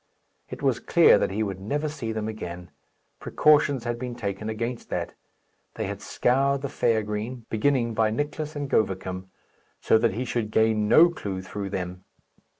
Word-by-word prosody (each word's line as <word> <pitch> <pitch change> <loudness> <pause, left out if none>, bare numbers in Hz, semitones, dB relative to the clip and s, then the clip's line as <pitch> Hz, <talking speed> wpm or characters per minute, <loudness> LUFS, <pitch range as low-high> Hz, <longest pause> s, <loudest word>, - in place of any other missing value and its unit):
It - - -8
was - - +2
clear - - +5
that - - 0
he 105 +3 -1
would 100 -3 -4
never 145 +10 -2
see 120 -7 -4
them 110 -1 -3
again. 90 -5 -7 0.5
Precautions 145 -4 +3
had 120 -1 -3
been 125 -1 -5
taken 105 -2 -4
against 115 +2 -4
that. - - -3 0.6
They - - -3
had - - -5
scoured 135 +2 +1
the 140 - -2
fair 115 -4 +1
green, 110 +3 -5
beginning 115 +1 +1
by 110 0 +2
Nicless 150 +5 -3
and 145 -1 -3
Govicum, 95 -5 -1 0.5
so 110 - +3
that 115 -3 +2
he 125 +3 -2
should 115 -3 -2
gain 110 -1 +2
no 170 +10 +7
clue 95 - -5
through 100 +1 -5
them. 90 -1 -5
110 Hz, 170 wpm, -26 LUFS, 105-130 Hz, 0.6 s, no